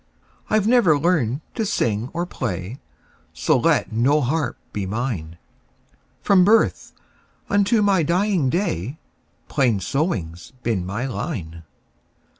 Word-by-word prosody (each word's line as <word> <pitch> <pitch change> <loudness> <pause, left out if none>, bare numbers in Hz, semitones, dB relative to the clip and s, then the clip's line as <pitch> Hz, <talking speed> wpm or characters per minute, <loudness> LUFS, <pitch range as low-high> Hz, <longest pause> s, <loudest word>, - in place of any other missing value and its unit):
I 215 - +3
've 205 - -2
never 225 -11 +4
learned 145 -5 +1
to 225 - -2
sing 115 - -1
or 170 +1 -2
play, 110 - -5 0.5
So - - +1
let - - +2
no 125 +7 +3
harp 145 0 -1 0.2
be 100 -2 -3
mine; 100 -7 -3 0.9
From 195 -3 +5
birth 220 +4 +2 0.6
unto 205 +2 +3
my 195 -3 +3
dying 175 -2 +1
day, 135 - -2 0.5
Plain 125 -8 +1
sewing 95 - -2
's 85 +9 -14
been 100 -6 -1
my 105 +7 -3
line. 85 -8 -5
135 Hz, 125 wpm, -22 LUFS, -, 0.9 s, From